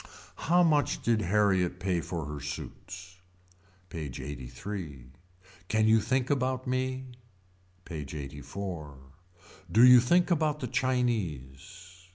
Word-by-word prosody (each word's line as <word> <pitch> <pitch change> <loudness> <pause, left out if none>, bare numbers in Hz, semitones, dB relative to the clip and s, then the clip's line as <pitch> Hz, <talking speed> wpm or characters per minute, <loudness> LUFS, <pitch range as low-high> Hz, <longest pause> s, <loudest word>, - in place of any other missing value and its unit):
How 175 +1 +6
much 150 -5 +2
did 115 -2 +2
Harriet 95 -2 +2
pay 90 -2 0
for 85 -3 -4
her 75 0 -6
suits. 90 +5 -8 0.7
PAGE 75 -7 -5
LXXXIII. 70 0 -7 0.6
Can 110 +1 +2
you 110 0 +5
think 130 +4 0
about 130 -2 0
me. 130 0 -1 0.8
PAGE 75 -4 -6
LXXXIV. 75 +2 -6 0.8
Do 115 +7 +7
you 125 -1 +10
think 175 +9 +3
about 155 -2 +1
the 130 - -3
Chinese. 95 - -2
100 Hz, 115 wpm, -29 LUFS, 80-130 Hz, 0.8 s, you